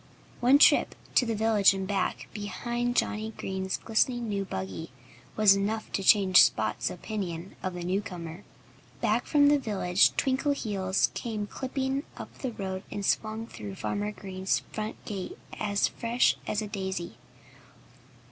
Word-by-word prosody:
One 255 +3 +6
trip - - +5 0.2
to 245 - +4
the 225 - 0
village 210 -2 +4
and 190 -1 -3
back, 195 -2 -1
behind 240 +4 -3
Johnnie 220 -1 -1
Green's 190 0 -3
glistening 240 +2 +1
new 200 -2 -1
buggy, 95 - -5 0.5
was 210 -2 +6
enough 210 +3 -2
to - - -1
change 190 -2 +7
Spot's 110 -1 +1
opinion 180 -2 -5
of 185 -1 -3
the 175 - -5
newcomer. 180 -1 -4 0.6
Back - - +1
from 290 -2 +5
the 290 0 +5
village 195 -6 +2
Twinkleheels 230 -9 0
came 215 -3 -3
clipping 265 +4 -2 0.2
up - - -9
the 260 - -3
road 190 -3 -4
and 200 - -4
swung 220 +2 0
through 105 - -8
Farmer 205 - -2
Green's 190 -2 -2
front 215 0 -4
gate 195 -3 -5 0.2
as 205 -1 +1
fresh 235 +1 +1
as 215 +1 -1
a - - -5
daisy. 190 - -4
205 Hz, 145 wpm, -28 LUFS, 190-225 Hz, 0.6 s, change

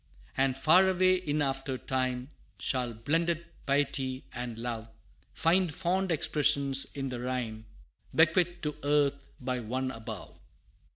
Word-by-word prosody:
And 135 -1 +2
far 160 +8 +6
away 185 0 +4
in 150 -4 -1
after 135 -1 -2
time, 130 0 -2 0.3
Shall 125 -2 0
blended 165 +8 0 0.2
Piety 135 -2 0
and 120 -2 -5
Love 115 -1 -4 0.4
Find 175 +1 +2
fond 190 +3 0
expression 140 -3 +2 0.2
in 135 -1 -3
the 125 -1 -4
rhyme, 120 -3 -3 0.5
Bequeathed 175 +2 +3
to 150 -1 -1
earth 140 -1 +1
by 125 -1 -2
One 130 +3 -2
above. 110 -4 -8
135 Hz, 125 wpm, -30 LUFS, 125-160 Hz, 0.5 s, far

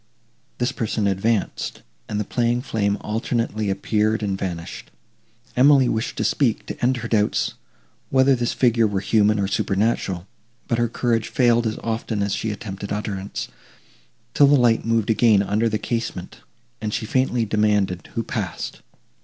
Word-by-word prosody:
This 120 0 0
person 110 -2 -2
advanced, 100 +2 -1 0.3
and 105 - -2
the - - 0
playing 120 +3 0
flame 100 -5 0
alternately 110 -1 -1
appeared 105 +3 0
and 100 -2 0
vanished. 85 -3 -5 0.7
Emily 135 0 +6
wished 110 +1 -2
to - - 0
speak, 125 -7 +1
to - - -7
end 125 +1 +3
her 115 -1 -5
doubts, 105 -2 +1 0.6
whether 135 +1 +4
this 120 -1 -1
figure 115 -3 +3
were 100 -2 -1
human 105 0 +3
or 100 - +1
supernatural; 100 -3 0 0.4
but 115 - 0
her 120 - +2
courage 115 -1 0
failed 120 -2 +3
as 110 - -3
often 110 -2 -2
as 100 -1 -1
she 110 - -2
attempted 100 -2 -6
utterance, 100 -1 -4 0.8
till 145 - +6
the 145 - +6
light 120 -4 +3
moved 115 -1 +1
again 110 -3 +4
under 105 +3 +1
the 110 - 0
casement, 110 -5 -4 0.4
and 105 -1 -2
she 110 - -3
faintly 125 0 +1
demanded, 105 -5 +1
who - - 0
passed. - - -4
110 Hz, 155 wpm, -22 LUFS, 100-120 Hz, 0.8 s, Emily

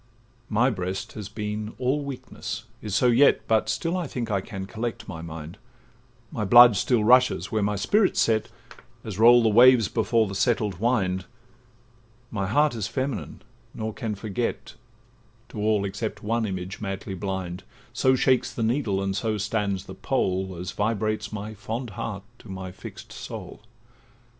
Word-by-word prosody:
'My 120 +5 +3
breast 95 -2 -4
has 105 -3 -7
been 105 0 -4
all 135 +3 0
weakness, 110 -6 -6 0.2
is 105 -3 -3
so 125 - +3
yet; 125 -1 +5
But 110 -1 +2
still 165 +2 -1
I 180 -4 -2
think 120 -4 -4
I 100 -2 +1
can 95 -1 -6
collect 115 +2 -5
my 80 -6 -6
mind; 80 +3 -8 0.7
My 110 - -3
blood 120 +2 +8
still 115 +2 +2
rushes 125 +3 +4
where 110 -2 +1
my 105 +1 0
spirit 195 - +2
's - - +4
set, 110 -2 +1 0.5
As 105 -2 -6
roll 120 +1 +7
the 110 - +4
waves 120 0 +6
before 110 0 +2
the 100 - -6
settled 100 -2 0
wind; 95 -6 +1 1.1
My 100 -3 -2
heart 145 +7 +3
is 110 -4 -3
feminine, 130 0 -4 0.3
nor 110 0 -4
can 110 -1 -4
forget— 110 +3 -3 0.8
To 110 - -7
all, 105 -1 +2
except 105 +3 -4
one 115 +1 0
image, 95 +1 -5
madly 95 -1 -4
blind; 95 -1 -4 0.3
So 130 0 +3
shakes 130 -1 +2
the 115 - -3
needle, 110 -5 0
and 95 0 -1
so 110 +1 -1
stands 100 -2 -1
the 95 - -9
pole, 95 -5 -1
As 90 0 -4
vibrates 110 0 -1
my 110 0 -5
fond 115 +3 -5
heart 100 0 -5 0.2
to 115 - -14
my 95 -1 -6
fix'd 95 - -11
soul. - - -8
110 Hz, 165 wpm, -25 LUFS, 95-120 Hz, 1.1 s, blood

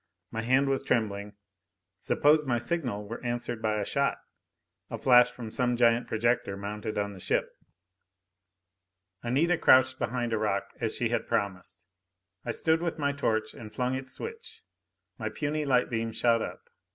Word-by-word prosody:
My 115 - -3
hand 130 +4 +3
was 135 -1 +1
trembling. 105 -3 -1 0.7
Suppose 150 +1 +3
my 125 -4 0
signal 120 -5 -2
were 115 +4 -7
answered 120 -1 -3
by 110 -1 0
a 100 - -2
shot? 140 +5 0 0.7
A - - -4
flash 125 -1 +6
from 120 -3 -8
some 125 +1 +1
giant 120 0 +3
projector 110 -3 0
mounted 105 +2 -5
on 100 0 -1
the 95 - -11
ship? - - 0 1.7
Anita 155 +9 +1
crouched 130 0 +5
behind 120 -1 -1
a 110 - +1
rock, 100 -2 -1
as - - -1
she - - 0
had - - -1
promised. 95 -2 -3 0.6
I - - -7
stood 160 +7 +1
with 170 -1 -2
my 145 -2 +1
torch 115 -6 -1
and 110 -2 -10
flung 125 +2 -1
its 130 0 -5
switch. 460 0 -8 0.6
My - - -2
puny 150 0 -2
light 125 -3 +2
beam 115 0 -1
shot 115 0 +2
up. - - -6
120 Hz, 165 wpm, -28 LUFS, 110-135 Hz, 1.7 s, flash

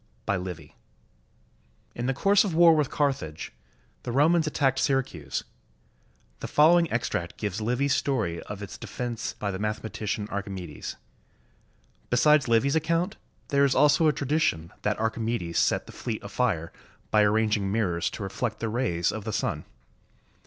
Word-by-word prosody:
] - - -37
BY 100 - +1
LIVY 90 -5 -7 1.2
[In 120 +1 -3
the 135 - +1
course 200 +7 +4
of 195 -5 -2
the - - -2
war 170 -1 +7
with 150 -3 +1
Carthage, 135 - -2 0.5
the 120 - -5
Romans 155 +5 +3
at 155 - -4
tacked 135 -2 +2
Syracuse. 130 - -1 1.0
The - - -5
following 170 +2 +4
extract 115 -7 -2
gives 105 0 -3
Livy's 125 +5 +1
story 110 -12 -1
of 100 0 -7
its 100 - -8
defense 120 -2 -4
by 100 -1 -3
the 95 - -5
mathematician 105 0 -3
Archimedes. 95 -6 -5 1.1
Besides 145 +3 +4
Livy's 120 +5 +3
account, 165 +4 0 0.3
there 140 0 +3
is 140 -2 +3
also 150 +2 +5
a - - +5
tradition 140 - -1
that 105 +1 -1
Archimedes 110 -6 -1
set - - +1
the - - -11
fleet 115 -3 -5
afire 100 -6 -1 0.4
by 105 - +5
arranging 105 -1 +2
mirrors 95 -6 0
to - - -7
reflect 110 +3 -3
the 115 - -2
rays 110 -8 0
of 110 - -6
the 110 - -4
sun. - - -2
115 Hz, 155 wpm, -27 LUFS, 100-140 Hz, 1.2 s, war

